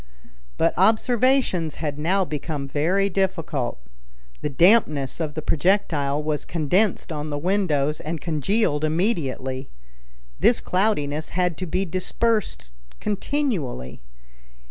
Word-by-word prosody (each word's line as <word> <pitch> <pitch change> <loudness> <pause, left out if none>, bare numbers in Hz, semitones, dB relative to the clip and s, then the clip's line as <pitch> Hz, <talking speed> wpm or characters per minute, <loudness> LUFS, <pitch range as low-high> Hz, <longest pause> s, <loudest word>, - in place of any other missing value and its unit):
But 165 - +2
observations 220 - +2
had 150 -2 -4
now 185 +5 +2
become 150 -2 -4
very 170 +8 +1
difficult. 170 - -1 0.6
the - - -1
dampness 155 - +3
of 155 -3 -3
the 155 - -4
projectile 150 -5 +1
was 150 -1 -1
condensed 175 +5 0
on 150 -1 -4
the 145 - -2
windows 155 -4 +1
and 160 +1 -4
congealed 155 - 0
immediately. 150 - -1 0.7
This 240 - +4
cloudiness 155 -7 0
had 180 -2 +1
to 185 - -4
be 185 +4 0
dispersed 185 - -1 0.3
continually. 205 - -2
165 Hz, 110 wpm, -23 LUFS, 145-195 Hz, 0.7 s, This